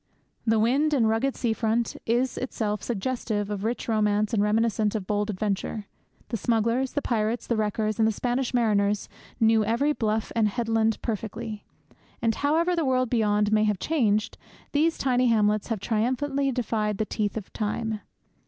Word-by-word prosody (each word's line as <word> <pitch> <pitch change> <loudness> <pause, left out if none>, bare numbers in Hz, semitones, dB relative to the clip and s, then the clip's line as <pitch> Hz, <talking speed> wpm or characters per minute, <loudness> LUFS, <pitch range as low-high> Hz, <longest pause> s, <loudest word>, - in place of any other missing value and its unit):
The 225 0 +4
wild 280 +7 +2
and 230 -5 +3
rugged 225 +5 +1
sea 235 -3 0
front 225 +1 0
is 245 +3 +1
itself 210 -5 -2
suggestive 215 -2 -2
of 205 -1 -3
rich 230 +3 -2
romance 215 -1 +1
and 210 - +3
reminiscent 215 0 +1
of 205 -4 -2
bold 205 +1 -1
adventure. 205 +1 -2 0.4
The 230 - -2
smugglers, 230 +4 +1
the 290 - -1
pirates, 225 0 0
the 235 - 0
wreckers, 215 0 -1
and 220 - +4
the - - +3
Spanish 245 +4 -1
mariners 210 -4 +1 0.3
knew 225 -1 +4
every 235 +8 +1
bluff 220 -4 -1
and 225 -2 +3
headland 225 0 0
perfectly. 220 -1 -4 0.5
And, 230 -1 +1
however 325 +8 +1
the 335 - 0
world 255 -3 +1
beyond 210 -3 +2
may 215 0 +4
have 210 -2 +1
changed, 215 - 0 0.3
these 320 +3 +2
tiny 255 -1 +2
hamlets 215 -2 +2
have 225 -3 -2
triumphantly 260 +6 0
defied 215 -4 -1
the 215 - 0
teeth 210 0 -2
of 210 - -7
time. 220 0 -2
225 Hz, 165 wpm, -26 LUFS, 210-245 Hz, 0.5 s, The